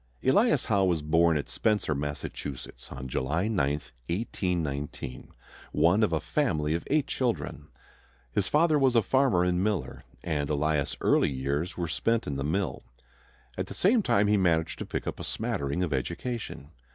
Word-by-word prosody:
Elias - - +4
Howe 100 -1 +3
was 85 -5 +1
born 80 +1 +4
at 70 - -3
Spencer, 105 -8 +1
Massachusetts, 70 -3 -6
on 65 0 -6
July 75 +9 -1
9, 75 -11 +1 0.4
1819, 80 - -3 0.5
one 90 +6 +4
of 105 - +3
a 80 - +1
family 80 - 0
of 85 - -2
eight 150 0 +3
children. 115 - -2 0.6
His 95 +9 0
father 155 0 +3
was 130 -3 +3
a 115 - +5
farmer 130 -10 +3
and 90 0 +1
miller, 105 -3 -2 0.2
and 75 -4 -1
Elias' 75 -1 0
early - - +3
years 70 +5 -2
were 85 -1 -1
spent 115 +7 0
in 70 - -3
the 70 - -2
mill. 80 0 -1 0.8
At - - -1
the - - -7
same 220 +5 +4
time 105 - +3
he 105 0 +3
managed 85 -4 +1
to - - -5
pick - - -3
up - - -4
a - - -5
smattering 70 +6 -2
of 80 -5 -1
education. 85 - -4
85 Hz, 165 wpm, -28 LUFS, 75-105 Hz, 0.8 s, a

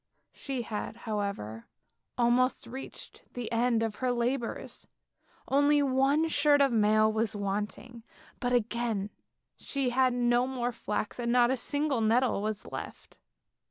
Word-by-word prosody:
She 265 -3 -4
had, 220 -1 -5
however, 200 - -4 0.5
almost 245 +1 +2
reached 260 +3 -9
the 240 -2 -4
end 230 0 +2
of 220 -2 -3
her 255 -1 0
labours, 240 0 -3 0.6
only 285 +1 +4
one 275 +4 +2
shirt 295 -2 +3
of 275 -2 +4
mail 215 -1 +3
was 220 -1 0
wanting, 210 +4 -4 0.4
but 245 - -1
again 235 -3 0 0.5
she 275 -3 -2
had 255 +1 +3
no 240 0 +2
more 250 -2 -2
flax 215 -1 -4
and 235 -1 -1
not 245 0 +4
a - - +2
single 285 0 -1
nettle 230 0 +2
was 215 0 -3
left. - - -9
240 Hz, 135 wpm, -29 LUFS, 215-260 Hz, 0.6 s, only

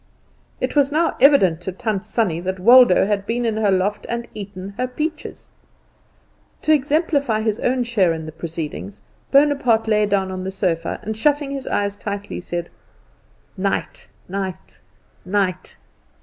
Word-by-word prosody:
It - - -2
was 285 -1 +3
now 325 +3 +1
evident 195 - +5
to 190 - -4
Tant 200 +1 -3
Sannie 215 -6 -1
that 185 +1 -4
Waldo 240 -1 +7
had 200 -1 -1
been 240 +1 -1
in 220 -2 0
her 215 -2 +2
loft 195 +2 0
and 235 0 -3
eaten 195 -2 -7
her 250 +3 -1
peaches. 305 +5 -5 1.1
To 310 - +4
exemplify 285 -5 +1
his 220 0 -1
own 250 0 +1
share 215 -7 +2
in 160 -1 -4
the 155 - -7
proceedings, 150 - -6 0.3
Bonaparte 275 -6 +3
lay 210 -1 +3
down 195 -2 0
on 185 0 -5
the 190 - -3
sofa, 175 -4 -2
and 220 +1 -3
shutting 290 +4 +1
his 275 -1 -5
eyes 200 0 -1
tightly, 205 0 -5
said, 175 -1 -5 0.9
"Night, 195 0 -2 0.2
night, 190 -1 -6 0.4
night!" 185 -2 -1
205 Hz, 150 wpm, -21 LUFS, 185-250 Hz, 1.1 s, Waldo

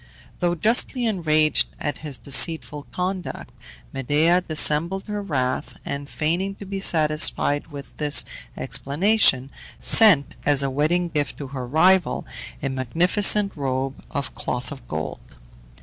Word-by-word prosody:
Though 175 -1 0
justly 235 - +1
enraged 155 -7 +1
at 145 - -4
his 145 -4 -3
deceitful 150 0 0
conduct, 185 0 -5 0.4
Medea 150 +7 +1
dissembled 165 +3 +2
her 210 -1 -5
wrath, 130 -8 -3
and, 140 0 -6
feigning 175 +6 -2
to 200 - -11
be 195 0 -5
satisfied 155 -4 +3
with 145 -3 -11
this 150 -1 +2 0.3
explanation, 145 -4 +2 0.3
sent, 195 -11 +5
as 145 -2 +3
a 135 - -2
wedding 165 +6 0
gift 150 -3 -3
to 140 -2 -8
her 130 -2 -6
rival, 180 +6 +2 0.4
a 135 - -1
magnificent 180 - 0
robe 135 -2 -4
of 140 -2 -4
cloth 125 0 -4
of 130 -4 -11
gold. 80 -4 -7
155 Hz, 130 wpm, -22 LUFS, 140-180 Hz, 0.4 s, sent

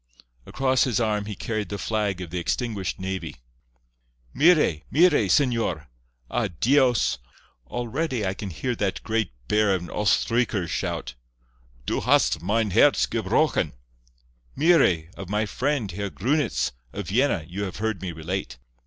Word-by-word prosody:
Across 130 -1 +2
his 125 -4 0
arm 105 -3 0
he 105 -1 -5
carried 110 -1 -3
the 100 - -4
flag 100 -2 -1
of 85 -3 -7
the 90 - -2
extinguished 100 +2 -2
navy. 95 -4 -4 1.0
"Mire! 150 - +4
mire! 160 - +4
señor. 115 - +1 0.4
Ah, 120 - 0
Dios! 120 - +3 0.5
Already 120 - -2
can 100 0 -6
I - - -8
hear 120 +10 -2
that 100 -2 -2
great 110 -4 -1 0.2
bear 105 - +3
of 90 - -4
an 85 - -9
Oestreicher 105 -1 +1
shout, 75 -2 -3 0.7
'Du - - -1
hast - - +3
mein 105 +3 0
herz - - +5
gebrochen!' - - +1 0.8
Mire! 135 - +3
Of 95 -2 -8
my 105 +1 0
friend, 130 0 -1
Herr 100 +3 -4
Grunitz, 125 - 0 0.2
of - - -6
Vienna, 115 - +1
you 100 +4 -4
have 95 - -6
heard 110 -1 -2
me 95 -2 -4
relate. 80 -4 -4
105 Hz, 145 wpm, -25 LUFS, 90-120 Hz, 1.0 s, herz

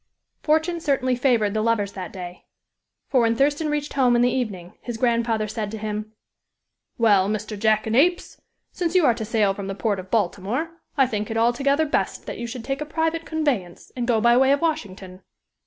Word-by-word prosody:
Fortune 320 +3 +1
certainly 265 -5 +1
favored 240 -5 +2
the 215 - 0
lovers 215 -3 +1
that 185 -4 -7
day; 180 -2 -9 0.6
for 260 -4 +3
when 230 0 +2
Thurston 290 +4 +1
reached 295 0 -2
home 255 -3 +3
in 240 - +4
the 245 - +3
evening, 195 -9 -3
his 240 -2 -5
grandfather 230 -2 +1
said 215 -1 -4
to 220 - -6
him: 215 0 -5 0.8
"Well, 205 -5 +4
Mr. 215 0 -3
Jackanapes, 220 - +1 0.3
since 350 -1 -2
you 360 -4 +5
are 240 - +5
to 225 - -5
sail 215 -3 +1
from 195 0 -6
the 195 - -4
port 205 -1 -1
of 185 0 -9
Baltimore, 220 - -1 0.3
I 270 - +5
think 210 -4 -3
it 225 - -2
altogether 275 +6 +2
best 295 - -2
that - - -6
you 235 - -4
should 235 0 -7
take 270 +1 -3
a - - -2
private 325 +1 -1
conveyance, 270 - -2
and 245 -2 -3
go 235 -3 +3
by 235 +2 +4
way 265 +1 +4
of 280 - +2
Washington." 195 - -3
235 Hz, 195 wpm, -23 LUFS, 210-275 Hz, 0.8 s, you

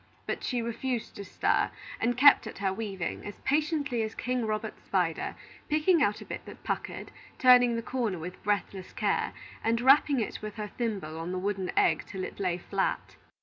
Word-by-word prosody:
But - - -3
she 245 -3 -1
refused 235 +1 -3
to 200 - -5
stir, 190 - +1 0.3
and 240 +1 +1
kept 285 +2 +7
at - - -8
her 195 -1 0
weaving, 195 -5 -4
as 205 - -8
patiently 290 -4 +1
as 220 0 -3
King 250 -2 -1
Robert's 215 0 -3
spider, 180 -4 0 0.3
picking 310 +2 +3
out 210 -6 +2
a - - -8
bit - - -6
that - - -12
puckered, - - -4 0.3
turning 245 -2 +6
the 230 - -2
corner 235 -7 -1
with 175 +3 -7
breathless 200 -2 -2
care, - - 0 0.3
and 230 +1 +2
rapping 270 +2 +5
it 220 - -3
with 215 -1 -6
her 210 -2 -5
thimble 195 -10 -3
on 165 +2 -4
the 185 - -2
wooden 190 -1 -2
egg - - +3
till 190 -2 -5
it - - -7
lay 180 -3 0
flat. 190 +2 -2
220 Hz, 190 wpm, -29 LUFS, 190-250 Hz, 0.3 s, kept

